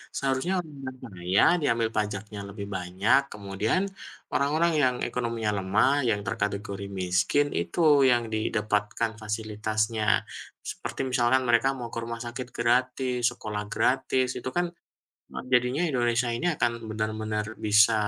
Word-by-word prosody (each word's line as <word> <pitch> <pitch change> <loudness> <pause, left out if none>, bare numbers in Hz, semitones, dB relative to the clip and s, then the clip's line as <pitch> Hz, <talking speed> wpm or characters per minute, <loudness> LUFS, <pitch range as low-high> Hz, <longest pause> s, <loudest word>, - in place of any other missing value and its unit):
Seharusnya 135 +7 0
orang 150 -2 -13
yang 130 - -6
kaya 95 -4 +1 0.2
diambil 115 -5 +1
pajaknya 105 0 -3
lebih 100 0 -7
banyak, 95 +9 +2
kemudian 105 - -1 0.5
orang-orang 155 +4 +2
yang 125 -2 +3
ekonominya 115 -3 -1
lemah, 105 +8 +3 0.2
yang 105 -2 +1
terkategori 100 -1 -3
miskin, 95 +11 +2
itu 85 - -2 0.3
yang 120 -1 +3
didapatkan 105 +1 0
fasilitasnya. 110 0 0 0.5
Seperti - - -7
misalnya 125 0 +3
mereka 120 +1 +3
mau 120 -2 -5
ke 115 - -2
rumah 115 0 -5
sakit 125 +1 -5
gratis, 125 +1 +1
sekolah 105 -1 -4
gratis, 130 0 +2
itu 130 - -4
kan 175 - +2 0.7
m - - -16 0.2
jadinya 125 +5 +3
Indonesia 120 -2 +1
ini 145 - -3
akan 120 - +2 0.2
benar-benar 110 0 -2 0.2
bisa 105 +2 +6
115 Hz, 130 wpm, -27 LUFS, 105-125 Hz, 0.7 s, bisa